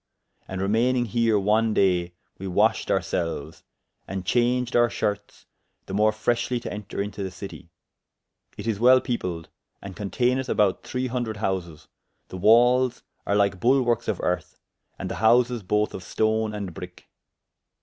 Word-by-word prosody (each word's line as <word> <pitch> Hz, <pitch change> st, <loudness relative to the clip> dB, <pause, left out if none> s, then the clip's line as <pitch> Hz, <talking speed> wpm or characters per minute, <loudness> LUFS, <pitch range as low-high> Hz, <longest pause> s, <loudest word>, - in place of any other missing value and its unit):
And 95 Hz, -, -5 dB
remayning 120 Hz, +5 st, +2 dB
here 115 Hz, -1 st, +2 dB
one 105 Hz, +2 st, +2 dB
day, 90 Hz, -2 st, +2 dB, 0.2 s
we 95 Hz, -, -5 dB
washed 90 Hz, -, +1 dB
ourselves, 85 Hz, -4 st, -2 dB, 0.4 s
and 95 Hz, -1 st, -5 dB
changed 125 Hz, +3 st, +1 dB
our 120 Hz, 0 st, +4 dB
shertes, 105 Hz, -1 st, -4 dB, 0.4 s
the -, -, -8 dB
more 105 Hz, +2 st, +3 dB
freshely 120 Hz, +3 st, -1 dB
to -, -, -5 dB
enter 105 Hz, -1 st, -7 dB
into 105 Hz, 0 st, -7 dB
the 95 Hz, -, -3 dB
citie; 90 Hz, -2 st, -10 dB, 0.9 s
it -, -, -7 dB
is 110 Hz, -3 st, -1 dB
well 130 Hz, +2 st, +6 dB
peopled, 90 Hz, -, -4 dB, 0.3 s
and 100 Hz, -2 st, -9 dB
conteyneth 125 Hz, +5 st, -1 dB
about 100 Hz, -3 st, +2 dB
three 130 Hz, 0 st, -3 dB
hundred 120 Hz, -3 st, -3 dB
houses; 90 Hz, -6 st, -3 dB, 0.4 s
the 95 Hz, -, -7 dB
walles 120 Hz, +5 st, +4 dB, 0.2 s
are 100 Hz, -, +2 dB
lyke 100 Hz, -2 st, +2 dB
bulwarkes 120 Hz, -1 st, +2 dB
of 105 Hz, -5 st, -1 dB
earth, 90 Hz, -, -2 dB, 0.4 s
and -, -, -5 dB
the -, -, -3 dB
houses 120 Hz, +1 st, +4 dB
both 105 Hz, +2 st, 0 dB
of -, -, -6 dB
stone 110 Hz, +4 st, 0 dB
and 100 Hz, -4 st, -5 dB
bricke. 90 Hz, -1 st, -10 dB
105 Hz, 150 wpm, -25 LUFS, 95-120 Hz, 0.9 s, well